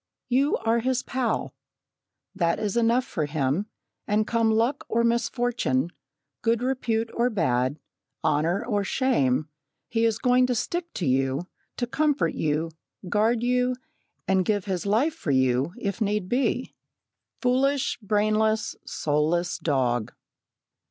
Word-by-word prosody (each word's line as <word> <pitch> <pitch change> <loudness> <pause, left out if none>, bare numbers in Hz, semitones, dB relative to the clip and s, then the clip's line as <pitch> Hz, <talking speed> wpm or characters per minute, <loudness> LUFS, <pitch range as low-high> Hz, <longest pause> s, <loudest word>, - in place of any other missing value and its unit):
You 270 +4 +3
are 225 +1 +1
his 255 +1 0
pal. 245 -3 -1 0.8
That 170 -4 +1
is 210 -1 -2
enough 235 +2 +3
for 155 -5 -2
him, 145 +6 0 0.4
and 215 +1 +2
come 230 0 +2
luck 230 +6 +1
or 235 +1 +2
misfortune, 235 - 0 0.5
good 230 +1 +1
repute 230 -3 -1
or 240 +1 +2
bad, 130 - 0 0.5
honour 170 +9 +1
or 205 -4 0
shame, 155 - +1 0.4
he 230 -1 +1
is 225 -2 +2
going 250 +2 +3
to 250 - 0
stick 340 +8 -2
to 175 - -2
you, 135 +4 +1 0.3
to 245 - 0
comfort 270 - +1
you, 155 +2 -1 0.4
guard 220 +4 +2
you, 250 +1 +2 0.5
and 190 -1 +3
give 205 0 0
his 190 -1 -2
life 245 +10 +2
for 315 - -6
you, 130 +2 +2
if 200 -2 -3
need 210 -2 0
be 250 +2 0 0.7
foolish, 265 +2 +1
brainless, 215 +1 +1
soulless 160 +4 0
dog! 125 -7 0
215 Hz, 130 wpm, -26 LUFS, 165-245 Hz, 0.8 s, You